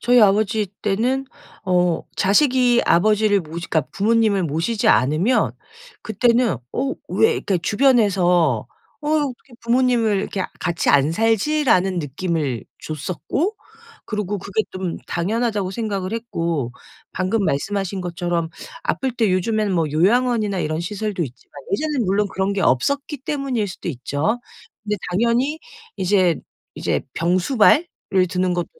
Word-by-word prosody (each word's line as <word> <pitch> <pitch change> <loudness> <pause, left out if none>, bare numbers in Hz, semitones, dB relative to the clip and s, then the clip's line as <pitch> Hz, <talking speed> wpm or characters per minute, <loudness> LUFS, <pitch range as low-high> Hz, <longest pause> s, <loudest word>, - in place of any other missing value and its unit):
저희 245 0 +4
아버지 210 +1 +3 0.2
때는 245 +7 0 0.4
어 180 -2 +2 0.2
자식이 245 +3 +3
아버지를 210 +2 +3
모시 165 +1 -7
그러니까 160 -3 +2
부모님을 215 -2 +2
모시지 165 +9 0
않으면 155 - +3 0.5
그때는 235 +2 +2 0.2
어 270 +2 -1
"왜" 450 0 +3
이렇게 190 -3 -1
주변에서 200 -5 +3 0.4
"어 295 - -3
이거 295 -2 +1
어떻게 250 0 -12
부모님을 235 -3 +2
이렇게 190 -2 -3 0.2
같이 170 -1 -1
안 145 +1 +4
살지?"라는 225 - +2
느낌을 150 - -2 0.2
줬었고 185 - -3 0.5
그리고 210 -2 -2
그게 200 +3 -1
좀 185 -2 -4
당연하다고 205 +1 -1
생각을 200 -2 -3
했고 170 - -2 0.4
방금 190 +3 0
말씀하신 195 +5 -1
것처럼 175 -1 -2 0.3
아플 265 -2 -1
때 225 -4 +1
요즘에는 210 +2 0
뭐 165 -2 +1
요양원이나 215 +4 +2
이런 155 +1 -2
시설도 205 +1 -3
있지만 130 -5 -9 0.2
예전에는 290 +1 0
물론 200 +2 +1
그런 190 +1 0
게 200 - -2
없었기 280 - +1
때문일 265 -7 -2
수도 180 - -7
있죠. 145 - -1 0.4
근데 210 0 -1
당연히 235 - +1 0.4
이제 185 -3 +2 0.3
이제 - - -1
병수발을 185 - +3 0.4
드는 180 +1 0
것도 175 - -1
200 Hz, 315 characters per minute, -21 LUFS, 175-235 Hz, 0.5 s, 저희